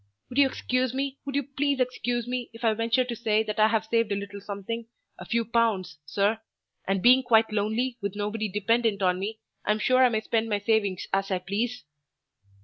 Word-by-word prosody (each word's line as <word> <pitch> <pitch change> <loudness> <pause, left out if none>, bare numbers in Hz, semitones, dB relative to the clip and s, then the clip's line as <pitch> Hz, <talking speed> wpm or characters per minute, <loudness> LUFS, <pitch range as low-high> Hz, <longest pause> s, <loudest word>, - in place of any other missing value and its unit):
Would 255 - -1
you 280 - +7
excuse 255 -1 -1
me 275 0 -2
would 275 -1 -4
you 285 - +1
please 280 0 -1
excuse 245 -1 -1
me, 245 -1 -3
if 225 - -12
I 225 -1 +4
venture 230 +3 +1
to 245 -1 -5
say 220 -1 +1
that 215 0 -4
I 215 - +6
have 220 0 +1
saved 230 -1 +1
a - - +2
little 200 0 -6
something, 210 +3 -5 0.3
a - - -8
few 230 -1 0
pounds, 210 -8 0
sir; 205 +8 +1 0.5
and 195 -1 0
being 255 +2 +7
quite 225 -3 +3
lonely, 225 +4 -1
with 200 0 -3
nobody 210 +1 -2
dependent 210 +1 +1
on 180 0 +2
me, 215 +3 -4 0.3
I'm 210 - +1
sure 255 +4 +4
I 250 - +6
may 220 -2 0
spend 225 0 0
my 205 - +1
savings 205 -3 0
as 195 0 +1
I 190 - +1
please?" 210 +7 -3
225 Hz, 210 wpm, -27 LUFS, 205-245 Hz, 0.5 s, you